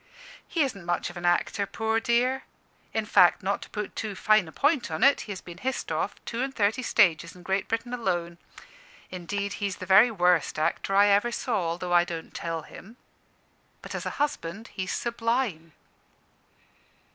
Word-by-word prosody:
"He 330 - -1
isn't 200 -9 -4
much 175 0 -1
of - - -17
an 175 0 -2
actor, 195 +3 +1
poor 220 +2 0
dear. 245 +3 +1 0.5
In 220 -1 -1
fact, 180 -4 +5
not 200 +2 -1
to - - -10
put 210 -2 -5
too 215 -3 -4
fine 215 -2 +3
a - - -10
point 290 - +1
on - - -2
it, 275 +1 +5
he - - -2
has 190 - -6
been 175 0 -11
hissed 265 +3 -3
off - - -1
two 235 +1 -3
and 265 +1 -1
thirty 215 +4 +1
stages 170 -8 +2
in 180 - -14
Great 190 +2 -1
Britain 230 +2 -3
alone. 175 -7 -2 0.7
Indeed, 200 +3 -3
he's 200 -2 -1
the - - -8
very 200 +6 +7
worst 180 -8 +2
actor 165 +5 0
I 205 +1 +6
ever 205 +4 +3
saw, 225 - -1
although 175 +2 -3
I 175 0 +6
don't 165 -2 -7
tell 165 -2 -4
him. 220 +10 -13 0.9
But - - -8
as - - -4
a - - -5
husband 225 - -3
he's 185 -2 -4
sublime." 230 - -1
200 Hz, 180 wpm, -27 LUFS, 175-230 Hz, 0.9 s, very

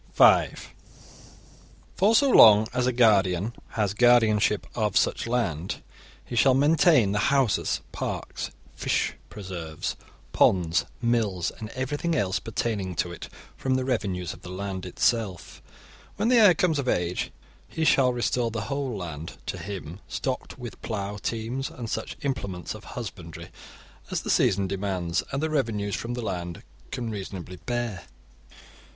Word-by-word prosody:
(5) - - +4 1.2
For 210 +4 +4
so 280 +2 +5
long 110 - +8
as 125 0 +1
a - - +3
guardian 105 -4 +3 0.2
has 105 -3 0
guardianship 110 -3 +4
of 105 -4 0
such - - +1
land, 95 -9 -2 0.4
he 120 - -6
shall 130 +2 +5
maintain 145 - +4
the 105 - 0
houses, 135 -6 +1
parks, - - -4 0.3
fish - - 0 0.2
preserves, 85 -6 -5 0.4
ponds, 85 -3 +3 0.2
mills, 110 -7 +1
and 110 - -8
everything 145 +6 -1
else 95 -7 +1
pertaining 105 -4 -2
to 90 - -1
it, 85 - -8 0.3
from 130 -1 0
the 130 0 0
revenues 95 -9 -1
of 80 - -14
the 90 - -9
land 95 0 -5
itself. 105 -2 -1 0.5
When 215 +3 +1
the 250 - +5
heir 205 -6 +7
comes 165 -4 +1
of 130 -2 -1
age, 90 0 -1 0.4
he 160 -1 -2
shall 130 -4 +5
restore 120 -1 0
the 115 -1 -3
whole 135 +1 -3
land 85 -3 -6
to - - -4
him, 95 -3 -7
stocked 130 +1 -4
with 120 -6 -9
plough 105 -2 -4
teams 115 +5 -3
and 120 -2 -7
such - - -4
implements 100 -10 -3
of 110 -1 -11
husbandry 95 -8 -8 0.6
as - - -1
the - - -2
season 100 0 +3
demands 95 -3 -1
and 135 +2 -2
the 160 - +1
revenues 110 -8 -1
from 120 +1 -4
the 120 - -4
land 85 -4 -4 0.3
can 120 -2 -4
reasonably 95 -3 -6
bear. 120 -6 -2
110 Hz, 145 wpm, -26 LUFS, 95-125 Hz, 1.2 s, long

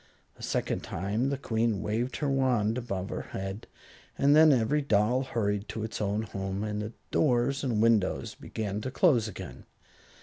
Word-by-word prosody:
A - - -17
second - - -1
time 105 +9 -1
the 140 - -1
Queen 115 -5 0
waved 120 +4 -1
her 150 - -1
wand 125 -6 +2
above 100 -6 -3
her - - -3 0.2
head, 95 +3 -5 0.5
and 140 +1 +5
then 155 0 +8
every 135 +4 +2
doll 115 0 +2
hurried 105 -5 -2
to 110 - -4
its 110 - -4
own 105 +1 0
home, 95 -1 -4
and 105 -1 -2
the 105 +2 -5 0.2
doors 135 0 +2
and 115 -5 +1
windows 110 -5 +2
began 105 -1 -4
to 130 - -3
close 130 - +3
again. 65 - -8
110 Hz, 170 wpm, -29 LUFS, 105-130 Hz, 0.5 s, then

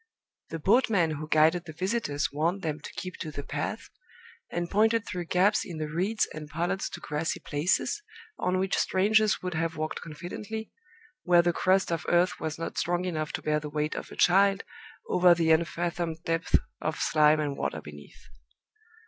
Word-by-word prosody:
The 165 - -4
boatmen 200 - +3
who 155 0 -5
guided 160 +3 +3
the 160 - -8
visitors 185 -4 -1
warned 165 +7 -1
them 155 -1 -2
to - - -10
keep 185 -1 -6
to 160 - -5
the 145 -1 -6
path, - - -4 0.6
and 175 0 -2
pointed 220 +3 +2
through 180 -2 -4
gaps 195 +5 +3
in 175 -5 -7
the 155 -1 -3
reeds 195 +7 +1
and 150 -1 -7
pollards 175 +5 -2
to - - -8
grassy 150 +2 -2
places, 170 - 0 0.4
on 180 0 +1
which 190 +1 0
strangers 215 +2 +2
would 180 -1 -3
have 165 0 -2
walked 155 0 -3
confidently, 185 +7 -7 0.5
where 175 -1 +5
the 175 0 +2
crust 190 +1 +2
of 165 - -2
earth 175 +1 +2
was 160 -1 -3
not 165 - -4
strong 175 +1 0
enough 155 -4 -2
to - - -4
bear 150 0 +1
the 150 0 -6
weight 150 +1 -1
of - - -6
a - - -10
child 195 +2 +4 0.4
over 180 -1 +5
the 165 -1 +2
unfathomed 170 0 0
depths 165 +1 0 0.3
of 155 - -2
slime 155 0 +4
and 145 -2 -1
water - - -2
beneath. - - -13
170 Hz, 180 wpm, -28 LUFS, 155-185 Hz, 0.6 s, where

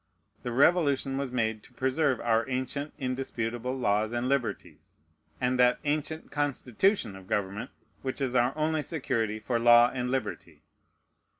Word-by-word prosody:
The 120 - -4
Revolution 140 -1 +3
was 135 -2 -2
made 110 -3 -1
to 125 - -20
preserve 130 +2 +1
our 115 0 +1
ancient 130 +3 -3
indisputable 125 -2 -3
laws 110 -2 +1
and 120 +1 -1
liberties, 125 -6 -3 0.4
and 125 0 0
that 125 0 +5
ancient 155 +2 -2
constitution 145 - 0
of 95 -1 -12
government 100 +2 -2 0.3
which 130 -1 -3
is 130 -3 -1
our 125 +3 +2
only 155 0 +1
security 115 -9 -2
for 115 +2 -1
law 120 +1 +7
and 125 -1 -2
liberty. 110 -9 -4
125 Hz, 140 wpm, -28 LUFS, 115-140 Hz, 0.4 s, law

